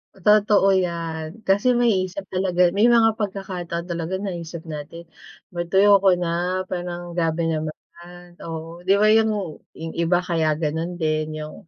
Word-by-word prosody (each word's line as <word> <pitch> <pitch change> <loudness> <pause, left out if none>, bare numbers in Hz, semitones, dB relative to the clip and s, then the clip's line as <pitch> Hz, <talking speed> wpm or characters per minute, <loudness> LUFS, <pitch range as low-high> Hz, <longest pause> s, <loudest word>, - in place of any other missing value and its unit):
Totoo 205 +1 +4 0.2
yan, 165 +2 -5
kasi 205 +6 +3
maiisip 200 -5 +1
talaga 180 -1 +2
may 205 +5 +3
mga 225 -2 +4
pagkakataon 185 -4 -4
talaga 170 +2 -3
naisip 170 -4 -6
natin, 160 +1 -8 0.5
mad 175 0 -3
"Ayoko 200 +2 +6
ko 195 - +6
na", 175 +2 -1
parang, 175 -1 -5
"Grabe 165 -1 0
naman", 155 -1 -2 0.7
oo. 165 +1 -7
'Di 195 - +5
ba, 210 +1 +4
yung 210 -7 0 0.2
yung 160 0 -6
iba, 170 +1 +1
kaya 160 -3 0
gano'n 160 +3 -2
din, 155 -1 -1
yung, 155 +1 -11
175 Hz, 145 wpm, -22 LUFS, 165-195 Hz, 0.7 s, Ayoko